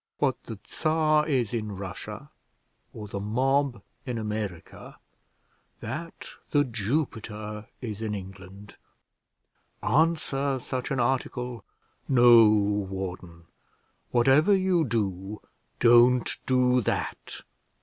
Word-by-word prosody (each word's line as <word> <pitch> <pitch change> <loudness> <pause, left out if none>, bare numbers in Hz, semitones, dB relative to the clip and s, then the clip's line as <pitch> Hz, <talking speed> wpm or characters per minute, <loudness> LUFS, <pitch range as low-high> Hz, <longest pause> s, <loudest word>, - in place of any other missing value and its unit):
What 135 -3 -1
the 110 - -7
Czar 155 -1 +1
is 125 -6 0
in 105 -3 -3
Russia, 95 -3 -8 0.6
or 105 -2 -8
the 100 0 -5
mob 130 +2 0 0.2
in 125 -3 -4
America, 105 -5 -6 0.8
that 155 +9 -6 0.2
The 145 -1 +3
Jupiter 110 -3 -3
is 110 -4 -5
in 110 -2 -2
England. 95 +1 -11 1.1
Answer 140 -3 +1
such 125 0 -4
an 135 -3 -1
article! 125 -2 -2 0.5
No, 120 -4 +7
warden; 95 -4 -2 0.7
whatever 135 +10 +4
you 185 -3 +2
do, 100 -3 -2 0.4
don't 120 +1 +5
do 125 -1 +3
that. - - -3
120 Hz, 100 wpm, -27 LUFS, 105-135 Hz, 1.1 s, No